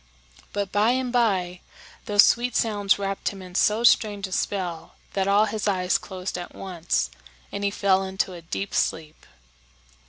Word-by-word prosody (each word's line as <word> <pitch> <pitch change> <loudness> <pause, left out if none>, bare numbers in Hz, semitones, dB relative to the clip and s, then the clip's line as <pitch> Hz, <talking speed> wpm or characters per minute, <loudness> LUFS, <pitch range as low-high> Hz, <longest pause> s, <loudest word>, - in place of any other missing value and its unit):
But 200 -1 -3
by 215 +4 +3
and 255 -1 -2
by 185 -7 +1 0.5
those 205 0 +6
sweet 245 0 +2
sounds 205 -3 +2
wrapped 195 -1 -2
him 195 -2 -9
in 180 -1 -11
so 215 +4 +2
strange 205 -4 +3
a 190 - -9
spell 180 -4 -3 0.2
that 195 -1 0
all 205 +2 +4
his 215 -1 -3
eyes 185 -2 +1
closed 185 -1 -5
at 175 - -9
once, 170 - -2 0.4
and 200 - -4
he 200 - +2
fell 195 -1 +2
into 190 0 -2
a 175 - -9
deep 190 +4 -5
sleep. 155 -1 -2
195 Hz, 165 wpm, -25 LUFS, 185-210 Hz, 0.5 s, those